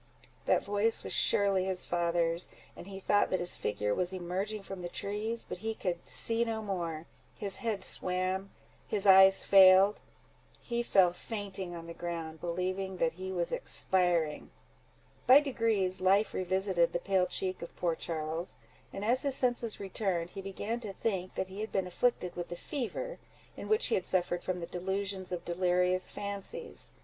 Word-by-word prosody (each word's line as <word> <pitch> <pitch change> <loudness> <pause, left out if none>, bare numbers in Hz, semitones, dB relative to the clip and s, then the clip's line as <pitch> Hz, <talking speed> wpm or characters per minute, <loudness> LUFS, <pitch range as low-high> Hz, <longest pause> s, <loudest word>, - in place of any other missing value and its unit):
That - - +3
voice 205 +3 +1
was - - -5
surely 195 -2 +3
his 190 -1 -2
father's, 170 0 0 0.3
and 175 - -10
he 195 -1 -7
thought 205 +1 +2
that 185 - 0
his 175 0 -1
figure 105 0 -1
was 180 - -1
emerging 190 +3 -3
from 195 -1 -7
the 175 - -5
trees; 215 +5 -2
but - - -6
he 225 +2 -3
could 175 -4 -3
see 230 0 +2
no 225 -1 -3
more:—his 175 +1 -5
head 215 -5 -2
swam—his 190 +2 -3
eyes 190 0 +7
failed—he 195 +5 +3
fell 190 -6 +4
fainting 195 -3 -5
on 165 -1 -8
the 170 - -7
ground, 165 -2 -5
believing 185 +2 -2
that 165 -2 +2
he 185 +2 -6
was 175 -2 -1
expiring. 175 -5 +1 0.8
By 260 +3 +10
degrees 225 -10 0
life 195 +3 +3
revisited 185 -2 +1
the 175 - 0
pale 185 0 +1
cheek 185 -1 -3
of 170 - -8
poor 170 -2 0
Charles; 160 +1 -4 0.3
and 195 - -5
as 245 +4 +2
his 280 -2 +1
senses 245 -4 0
returned, 190 -3 -2
he 195 - -7
began 200 +4 -4
to 210 -4 -6
think 190 -4 -2
that 190 - -2
he 195 +2 -6
had 220 - -4
been 190 -1 0
afflicted 180 0 0
with 175 -1 -4
the 175 - -4
fever, 405 - -4 0.4
in - - -8
which 435 +2 +3
he - - 0
had 185 - 0
suffered 175 -1 0
from 185 -1 -2
the 170 - -4
delusions 190 +2 -3
of 175 -1 -4
delirious 180 +1 +1
fancies. 200 - -4
190 Hz, 165 wpm, -31 LUFS, 175-205 Hz, 0.8 s, By